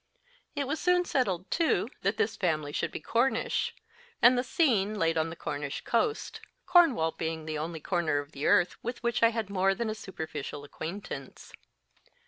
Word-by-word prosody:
It 285 -1 -1
was 310 +3 -2
soon 360 0 +3
settled, 195 - -1
too, 330 -1 +2
that - - 0
this 445 - +1
family 155 -5 -1
should - - -1
be - - -5
Cornish, 235 +10 0 0.4
and 245 +2 +7
the 245 - +1
scene 225 - +2
laid 165 -3 +2
on 160 0 +1
the 165 - -7
Cornish 145 -3 -4
coast, 435 - -1 0.2
Cornwall 330 - +5
being 160 -1 -4
the 155 -1 -3
only 160 +1 -4
corner 170 -5 0
of 145 +1 -4
the 140 -2 -3
earth 175 0 +3
with 240 +1 -5
which 235 -1 0
I 230 - +7
had 225 -3 -3
more 195 0 +2
than 230 0 -2
a - - -2
superficial 155 -8 -6
acquaintance. 165 +7 -7
195 Hz, 175 wpm, -29 LUFS, 160-245 Hz, 0.4 s, and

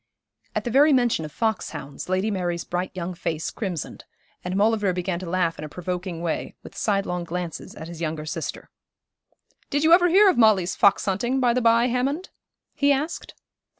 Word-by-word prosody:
At - - 0
the 240 - -3
very 290 +5 +6
mention 240 -10 +2
of 150 - -8
fox 220 +6 -1
hounds 140 +5 -8
Lady 190 +4 +1
Mary's 175 -3 -2
bright 180 +1 -3
young 180 0 -4
face 160 -2 -3
crimsoned, 185 -8 -5 0.4
and 180 +1 -3
Maulevrier 205 -1 +2
began 180 -1 -2
to 180 -2 -6
laugh 170 -3 0
in - - -5
a 155 - -6
provoking 180 +1 -4
way, 165 - -3
with - - -12
side 200 -2 0
long 180 0 -3
glances 170 -1 -5
at 160 - -8
his 170 -1 -9
younger 155 -1 -3
sister. 150 - -5 1.0
'Did 290 +1 0
you 320 +1 +6
ever 355 0 +6
hear 395 +4 +6
of 365 - +3
Molly's 200 -6 +4
fox 200 -1 +4
hunting, 240 +7 0
by 245 -2 +3
the 255 - +1
by, 230 0 +4
Hammond?' 265 +8 -1 0.4
he 285 0 +2
asked. 295 +5 -2
190 Hz, 190 wpm, -24 LUFS, 175-240 Hz, 1.0 s, very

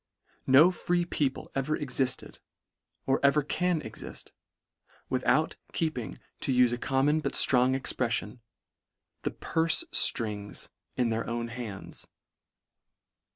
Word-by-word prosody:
No 145 +7 +6
free 175 -1 -1
people 140 -5 -3
ever 140 +3 -1
exifted, 130 -2 -2 0.7
or 135 0 +1
ever 140 +1 +3
can 175 +2 -1
exift, 110 -6 -10 0.8
without, - - +1 0.2
keeping, 130 - -3 0.2
to - - -1
ufe 125 -1 +3
a 120 - -4
common 140 +4 +1
but - - -3
ftrong 130 +1 +5
expreffion, 120 -3 -3 0.4
" - - -58
the - - +1
purfe 165 - +1
fixings" 105 -3 +3 0.3
in 125 -2 0
their 115 0 -2
own 115 0 -3
hands. 115 -5 -7
130 Hz, 115 wpm, -28 LUFS, 120-150 Hz, 0.8 s, No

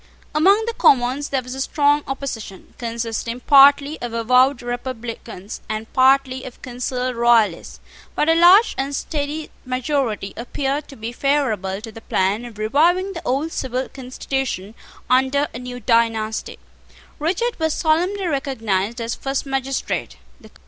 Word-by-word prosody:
Among 390 +8 +4
the 465 - -2
Commons 265 - +3
there 265 -2 -1
was 250 +1 -7
a 265 - -4
strong 290 +1 +2
opposition, 250 -8 -6
consisting 230 0 -3
partly 280 +3 +5
of 240 -1 -5
avowed 250 +3 +3
Republicans, 235 -4 -6
and 215 +1 -5
partly 260 0 +3
of 250 - -10
concealed 250 0 -3
Royalists: 230 -6 +2 0.4
but 300 - +1
a 325 - +5
large 360 +7 +6
and 275 +1 -1
steady 295 +1 -4
majority 255 -6 -2
appeared 275 +4 -3
to 275 - -12
be 225 0 -6
favourable 230 -8 0
to 225 0 -8
the 225 - -11
plan 200 +3 0
of 230 -3 -11
reviving 335 - +2
the 335 - -6
old 280 +6 -1
civil 260 -2 -3
constitution 255 -5 -4 0.3
under 265 +3 +2
a 235 - -6
new 250 0 -7
dynasty. 225 -2 0 0.6
Richard 370 +10 -1
was 320 -1 0
solemnly 360 +5 +1
recognised 235 - -1
as 230 0 -2
first 270 +1 -3
magistrate. 270 -1 -2
255 Hz, 140 wpm, -21 LUFS, 230-285 Hz, 0.6 s, large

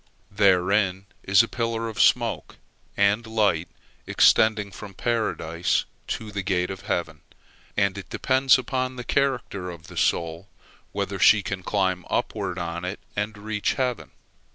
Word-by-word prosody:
Therein 95 -1 +2 0.2
is 100 +3 +5
a - - -3
pillar 115 -1 -2
of 105 -4 -2
smoke 115 +2 +2 0.4
and 100 +3 +2
light 105 -7 +1 0.4
extending 105 -2 +4
from 100 -2 -10
Paradise 90 -8 0 0.2
to 110 -1 -4
the 100 0 -3
gate 90 -1 0
of 95 - -9
heaven, 80 -3 -2 0.6
and 100 -1 +2
it 95 - -10
depends 130 0 +3
upon 130 0 -2
the 125 - -6
character 125 -9 -1
of 85 -2 -10
the - - -11
soul 85 +3 0 0.4
whether - - -3
she 105 -2 +6
can 95 0 -4
climb 95 -2 0
upward 100 -6 -2
on 85 0 -4
it 90 +3 -4 0.2
and 105 +1 -3
reach 105 0 -1
heaven. 125 -3 -2
100 Hz, 145 wpm, -25 LUFS, 90-115 Hz, 0.6 s, she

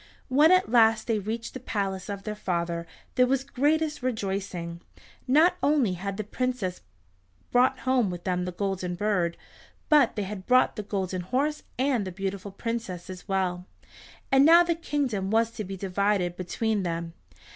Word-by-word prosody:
When 295 +6 +5
at 370 -8 +4
last 225 -2 +5
they 225 -3 0
reached 225 +3 -4
the 260 - -6
palace 195 -5 -3
of 200 -1 -5
their 215 - -3
father 170 -4 -2 0.3
there 250 0 +4
was 265 +1 0
the - - -24
greatest 305 +2 +1
rejoicing. 190 -7 -3 0.5
Not 310 +7 +5
only 280 -9 +2
had 195 +2 -4
the 215 - -2
princes 225 -4 -3 0.7
brought 255 +1 +3
home 255 -5 +2
with 175 -1 -6
them 180 -1 -1
the 180 - -3
Golden 185 -1 -2
Bird, 180 -4 0 0.5
but 295 -6 +5
they 210 - -1
had 190 -1 -7
brought 255 0 +4
the 215 - -3
Golden 190 -3 -3
Horse, 275 - -1 0.2
and 260 -4 +1
the - - -4
beautiful 195 +2 -4
Princess 200 -4 -5
as 185 0 -10
well, 185 -2 -1 0.6
and 270 0 +6
now 335 +3 +8
the 340 -1 +1
kingdom 280 - -2
was 225 +2 +2
to 215 - -5
be 195 0 -6
divided 195 -1 0
between 205 +4 -1
them. 170 -2 -3
210 Hz, 170 wpm, -27 LUFS, 185-255 Hz, 0.7 s, now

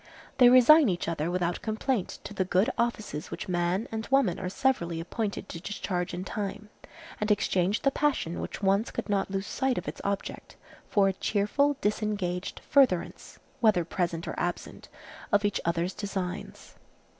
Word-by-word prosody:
They 245 -1 +9
resign 255 +3 +7
each 175 -2 -2
other 165 -1 -1
without 175 -1 -1
complaint 220 -1 -2
to - - -7
the 190 - 0
good 190 +7 +2
offices 215 -10 -2
which 210 - -6
man 180 +4 0
and 220 0 -4
woman 270 -11 +2
are 185 -1 -3
severally 185 -9 0
appointed 200 +4 -3
to 165 - -7
discharge 185 -3 -3
in 180 +1 -4
time, 205 +1 -5 0.5
and 210 - -1
exchange 195 -1 +1
the 275 - +4
passion 270 - 0
which - - -6
once 195 +3 +2
could - - -5
not 200 -1 +1
lose 195 0 -2
sight 265 +2 -1
of - - -4
its - - -5
object, 200 0 -4 0.3
for 200 -2 +4
a - - -1
cheerful, 220 +10 +1
disengaged 205 -4 -2
furtherance, 260 -11 +2 0.2
whether 210 -7 +3
present 170 -1 -2
or - - -3
absent, 175 0 -4 0.4
of 205 -1 +3
each 205 - 0
other's 170 +2 0
designs. 190 -3 -5
200 Hz, 165 wpm, -28 LUFS, 180-220 Hz, 0.5 s, They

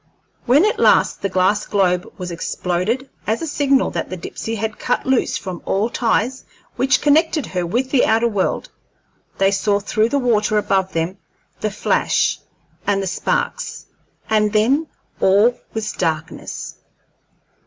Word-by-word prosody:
When 280 +10 +5
at 430 - 0
last - - +3
the 200 - -1
glass 190 +3 +1
globe 180 -3 +1
was 180 -2 -5
exploded, 180 +9 -2 0.2
as 220 +2 +1
a - - -1
signal 280 -3 +2
that - - -3
the 185 - -5
Dipsey 225 +6 -5
had 220 0 -4
cut 245 - -1
loose 265 -2 +1
from 185 -3 -6
all 210 +4 0
ties 245 +2 0 0.3
which 260 0 +2
connected 305 0 +3
her 180 -2 -3
with 250 +8 -1
the 270 - +4
outer 225 +2 +3
world, 205 -4 -1 0.7
they 195 0 +3
saw 200 +1 +1
through 215 +2 +1
the 285 - +1
water 215 -5 +2
above 190 -2 +1
them 165 +4 -2 0.4
the 215 - -1
flash 205 - +1 0.5
and 200 -1 +2
the 195 - -2
sparks, - - -2 0.4
and 215 -1 +2
then 265 +9 +2 0.3
all 205 +6 +4 0.2
was 215 -1 -2
darkness. 160 -2 -4
215 Hz, 150 wpm, -20 LUFS, 190-250 Hz, 0.7 s, When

